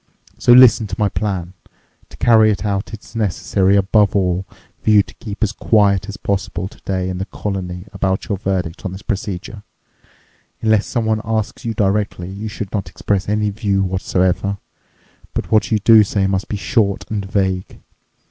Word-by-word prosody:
So - - +4
listen 120 -3 +7
to 95 - -4
my 105 -1 +2
plan. 95 -4 -3 0.6
To - - -14
carry 110 -2 +5
it 105 0 -1
out, 100 -1 -2
it's 110 0 -11
necessary, 100 -2 +1
above 100 +1 +3
all, 90 -1 0 0.3
for - - -1
you 105 -1 +6
to - - -15
keep 110 0 -5
as 105 - +1
quiet 100 -3 +2
as 100 - -6
possible 95 -1 -2
today 95 -1 -4
in 90 -1 -4
the 95 - -2
colony 90 -3 -5
about 95 0 -1
your 100 -3 -2
verdict 95 -5 -2
on 95 -3 -4
this 95 +1 -9
procedure. 100 0 -4 1.0
Unless 110 -2 +3
someone 110 -3 0
asks 110 0 -3
you 115 -1 -2
directly, 100 -3 0
you 100 +3 -6
should 105 -2 -6
not 95 -5 -3
express 100 +3 -2
any 105 0 +1
view 100 -2 0
whatsoever. 95 +1 0 0.8
But - - -3
what 110 +1 +3
you 110 - +4
do 110 +1 +6
say 100 -1 0
must 95 0 -1
be 105 - -3
short 100 +1 0
and 105 -2 -2
vague. 95 -1 -2
100 Hz, 175 wpm, -19 LUFS, 95-105 Hz, 1.0 s, listen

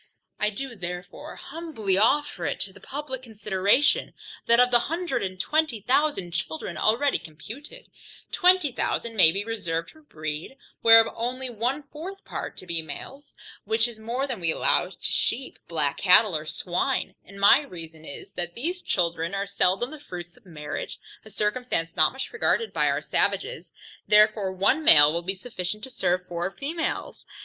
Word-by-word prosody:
I 210 - +2
do 245 +4 -6
therefore 180 -1 -7
humbly 290 - -3
offer 220 - +2
it - - -2
to 200 0 -4
publick 270 -2 -6
consideration, 210 +2 +1 0.3
that 235 +1 +5
of 250 0 +5
the 240 - +6
hundred 345 +2 -1
and 185 -1 -4
twenty 305 -2 0
thousand 270 - +1
children, 170 0 -4
already 230 - +2
computed, 240 - -11 0.5
twenty 360 -5 +4
thousand 235 -1 -2
may 175 -6 +7
be 200 +4 -3
reserved 170 -7 -3
for 315 - -19
breed, 155 - -6 0.2
whereof 225 0 +7
only 250 +2 -3
one 245 +6 -1
fourth 340 +8 -9
part - - -6
to - - -8
be 170 -2 -1
males; 265 - -10 0.3
which 220 +2 +2
is 235 -2 -10
more 240 +5 -2
than 255 -6 -4
we 170 -2 -1
allow - - +2
to - - -15
sheep, 260 +3 -1
black 150 -4 -1
cattle, 190 0 +6
or 155 0 -3
swine, 180 - -1
and 200 +1 -13
my 200 +6 +7
reason 165 - -10
is, 140 - -9
that 175 -1 -3
these 350 +9 -3
children 170 0 -1
are 195 0 -1
seldom 200 +5 +1
the 310 - -9
fruits 175 -9 -9
of - - -22
marriage, 150 -3 -6 0.3
a 215 - -13
circumstance 210 -6 -1
not 155 - +5
much 265 +1 -6
regarded 455 0 0
by - - +2
our - - 0
savages, - - -1 0.4
therefore, 210 -2 +4
one 195 +12 +2
male 145 - +8
will 170 - -1
be 190 +3 -2
sufficient 200 -1 -5
to 265 - -6
serve 180 -3 0
four 175 +1 -2
females. 310 - -4
210 Hz, 170 wpm, -26 LUFS, 175-265 Hz, 0.5 s, male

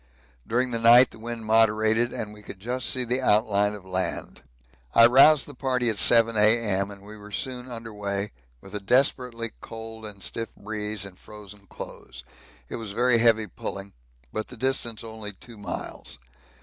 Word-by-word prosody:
During 125 +2 0
the 115 - -1
night 120 +2 +7
the - - -14
wind 115 0 -6
moderated 110 +1 +3
and 105 -1 -5
we 105 - -13
could 100 -2 -11
just 125 +4 -2
see 125 0 +1
outline 105 -3 +2
of 100 -2 -12
land. 95 0 -3 0.5
I 115 - +8
roused 135 +4 +6
the 145 - -11
party 125 -3 0
at 105 - -5
7 115 +4 +6
A.M. 105 -2 +2
and 100 -1 -12
we 105 +1 -11
were 105 0 -12
soon 125 +4 -5
under 115 -2 -7
weigh, 100 0 -3 0.3
with 95 - -14
a 105 - -2
desperately 120 +1 +1
cold 110 -1 -8
and 100 -2 -8
stiff 115 0 -4
breeze 105 -1 -3
and 95 -2 -12
frozen 105 -1 -13
clothes; 65 -7 -10 0.4
it - - -6
was 110 -4 -7
very 120 +1 +3
heavy 115 -2 +4
pulling, 100 -1 -7 0.4
but 110 0 -3
the 125 - -11
distance 120 -3 -2
only 110 -2 -7
two 115 +3 -14
miles. 100 - -7
110 Hz, 175 wpm, -25 LUFS, 105-120 Hz, 0.5 s, I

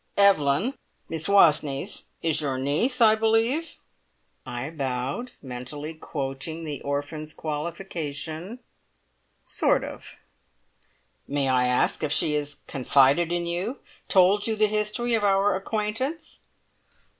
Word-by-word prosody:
"Evelyn 200 - +4 0.4
Miss 160 -1 -2
Wastneys 160 -3 +3 0.2
is 160 -1 +1
your 135 -3 -1
niece, 150 - 0
I 220 -2 +8
believe?" 225 +8 +1 0.7
I 125 +5 -4
bowed, 135 - -3
mentally 135 +5 -6
quoting 155 +1 -5
the 145 -3 -4
orphan's 145 +2 -4
qualification: 160 - -5 0.8
"Sort - - +2
of!" - - -8 1.1
"May 140 -1 0
I 125 -1 +3
ask 125 0 +1
if 150 - -1
she 150 0 +1
has 145 0 -2
confided 140 +5 +3
in 175 0 0
you 180 +10 -2 0.3
told 195 +3 +4
you 220 - 0
the 215 0 +4
history 215 +3 0
of 225 -2 +2
our 195 0 +3
acquaintance?" 220 - -3
160 Hz, 115 wpm, -26 LUFS, 145-210 Hz, 1.1 s, I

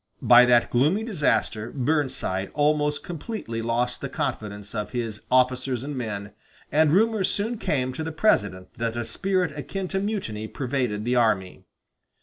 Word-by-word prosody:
By 120 0 +8
that 120 -1 +4
gloomy 150 - +2
disaster 145 - 0
Burnside 130 -9 -1
almost 150 -1 +1
completely 165 - -5
lost 120 +2 -1
the - - -4
confidence 105 -1 -4
of 105 +2 -4
his 115 -4 -3
officers 130 0 +2
and 145 +1 -5
men, 105 -5 -5 0.4
and 150 +1 +4
rumors 215 +2 +3
soon 220 +3 -2
came 130 -3 -1
to 160 - -4
the 160 - -4
President 105 - +1
that 115 0 -2
a 120 - -2
spirit 180 +5 -1
akin 185 +6 -4
to 195 - -1
mutiny 190 - -3
pervaded 125 -5 -2
the 125 +1 +1
army. 95 -5 +1
125 Hz, 150 wpm, -25 LUFS, 115-160 Hz, 0.4 s, By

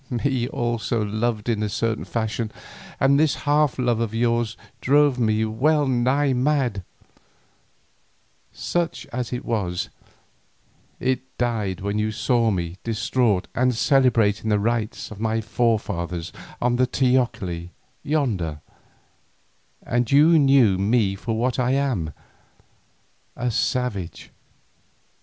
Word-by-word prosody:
Me 125 0 0
also 120 -3 -1
you 105 - -6
loved 110 0 -1
in 115 -3 0
a 105 - -1
certain 110 +2 -2
fashion 110 -1 -2 0.5
and 140 +1 +4
this 155 -2 +3
half 145 -2 +2
love 120 -3 +1
of 115 -1 -2
yours 115 -1 0 0.2
drove 145 -1 +3
me 110 -1 +2
well 145 +7 +2
nigh 130 +2 +2
mad; 130 -5 +1 1.7
such 175 -1 -2
as 125 0 -3
it 125 0 -4
was, 95 -6 -2 1.1
it 130 -1 0 0.2
died 110 -7 -1
when 100 +2 -1
you 110 0 0
saw 115 +1 +1
me 90 -3 -2
distraught 115 -3 0
and 125 0 +1
celebrating 115 -5 +2
the 105 - +3
rites 110 +1 -2
of 105 - -9
my 110 0 0
forefathers 100 -7 -1 0.3
on 120 0 +1
the 130 0 +3
teocalli 120 -10 0 0.3
yonder, 115 - -1 1.2
and 120 0 -1
you 155 +4 +6
knew 135 -9 +4
me 105 0 +2
for 110 +3 -3
what 125 +2 0
I 125 +1 +2
am, 130 - 0 1.2
a 125 0 -1
savage. 110 -6 -2
120 Hz, 120 wpm, -23 LUFS, 105-130 Hz, 1.7 s, you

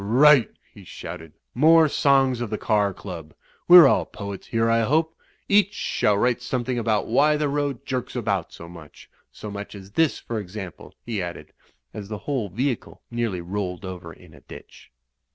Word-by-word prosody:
"Right," 130 +4 +5 0.2
he - - -14
shouted. 80 -2 -9 0.2
"More 160 +4 +5
songs 135 -4 +2
of 120 - -3
the 105 - -3
car 105 -2 +1
club! 85 -5 -9 0.3
We're 175 -2 +10
all 135 - +3
poets 100 -2 -8
here, 115 0 0
I 115 0 +3
hope. 160 +8 +1 0.3
Each 205 0 +3
shall 105 - 0
write 125 +3 +1
some 125 0 -2
thing 125 -1 -2
about 110 -2 0
why 145 +5 +3
the 150 0 0
road 140 -3 -2
jerks 130 -1 -4
about 100 -7 -2
so 85 - -11
much. 85 -3 -14 0.2
So 105 - -9
much 100 0 -7
as 95 0 -12
this, 160 +6 +1
for 115 -2 -5
example," 95 -3 -9
he 110 -5 -3
added, 85 -1 -7 0.4
as 105 -2 -8
the 105 - -4
whole 130 -8 -2
vehicle 125 +6 -3
nearly 115 -6 -2
rolled 90 0 -4
over 90 -3 -8
in - - -17
a - - -16
ditch. - - -14
115 Hz, 180 wpm, -23 LUFS, 100-135 Hz, 0.4 s, We're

